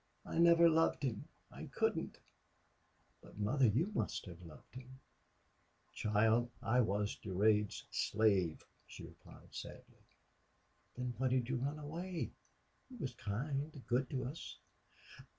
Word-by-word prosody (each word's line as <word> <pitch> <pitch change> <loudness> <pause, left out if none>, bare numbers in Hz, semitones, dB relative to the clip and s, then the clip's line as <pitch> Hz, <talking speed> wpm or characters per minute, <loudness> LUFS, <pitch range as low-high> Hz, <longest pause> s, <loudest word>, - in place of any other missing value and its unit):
I - - -2
never 170 0 +7
loved 165 -2 +3
him. 120 -6 -2 0.3
I - - -8
couldn't.... - - -1 1.0
But, - - -15
mother, 120 +6 +3
you 150 - +1
must - - -2
have 90 -2 -10
loved 80 -5 -14
him!" 130 +1 -11 0.9
"Child, 110 +3 +2
I 125 +3 +2
was 105 -1 0
Durade's 105 +1 +2
slave," 100 -7 +1 0.2
she - - -10
replied, - - -14
sadly. - - -9 0.9
"Then 125 0 -3
why 130 - +2
did 125 -1 +1
you 130 - +1
run 140 +4 -2
away? 165 +4 -4 0.6
He 260 - -11
was 135 - -4
kind 135 +8 -3
good 125 +2 +1
to 130 -2 -2
us." 135 +6 -6
125 Hz, 130 wpm, -36 LUFS, 105-145 Hz, 1.0 s, never